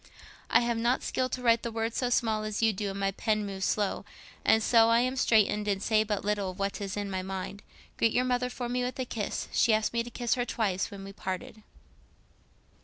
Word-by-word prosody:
"I 230 - +5
have 235 -1 0
not 240 +3 +1
skill 255 0 -1
to 255 - -4
write 230 -1 +4
the 235 - -4
words 225 0 -2
so 250 - 0
small 220 -3 +1
as 215 +1 -2
you 225 -1 +4
do 205 +1 -3
and 195 0 -5
my 195 0 +1
pen 215 +1 0
moves 195 -1 -3
slow. 205 -2 0 0.4
And 220 0 +4
so 230 0 +5
I 230 +1 +5
am 255 +1 0
straitened, 210 -4 +3
and 200 -2 +1
say 215 -1 +3
but 210 -2 -3
little 205 -2 0
of 185 - -8
what 200 +1 -2
is 200 0 -4
in 205 -1 -3
my 185 -1 -2
mind. 190 +1 -5 0.4
Greet 230 - +3
your 250 - +2
mother 250 0 0
for 245 -1 -5
me 250 +1 -1
with 250 +1 -3
a 260 - -2
kiss. 215 -4 -3
She 225 - +4
asked 215 +2 -1
me 235 - +1
to 235 - -6
kiss 240 -1 -1
her 245 - 0
twice 200 -6 -1
when 200 -2 -9
we 195 0 -9
parted." 190 +3 -5
220 Hz, 240 wpm, -29 LUFS, 200-235 Hz, 0.4 s, I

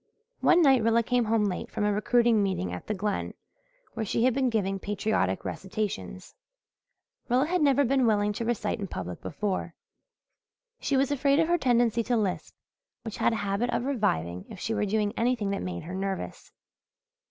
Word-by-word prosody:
One 345 - +5
night 265 -4 +5
Rilla 230 +1 +3
came 245 0 +1
home 220 -1 +2
late 185 -3 -3
from - - -3
a 210 0 +2
recruiting 230 +1 +3
meeting 185 - -1
at 90 - -7
the 215 - -1
Glen 205 +1 -2 0.6
where 225 - -3
she 225 +2 0
had 255 0 +4
been 260 0 +1
giving 195 -4 -1
patriotic 200 - -1
recitations. 190 - -4 1.0
Rilla 255 +3 +3
had 355 +2 0
never 285 -1 +4
been 260 -1 +2
willing 210 -1 +2
to 230 - -4
recite 225 -1 -1
in 200 - -4
public 90 - -6
before. 185 - -3 1.0
She 275 - 0
was 270 +1 +2
afraid 280 0 +2
of 325 - +3
her 345 0 +3
tendency 240 -3 +2
to 240 +1 0
lisp, 200 -4 -2 0.5
which 225 -3 -6
had - - +2
a - - -1
habit 200 +5 0
of 235 - -1
reviving 90 - -1
if - - -9
she 225 - -2
were 210 - 0
doing 210 0 0
anything 230 -4 0
that 200 - -2
made 90 -1 -5
her 180 - -7
nervous. 190 0 -4
220 Hz, 185 wpm, -27 LUFS, 195-245 Hz, 1.0 s, One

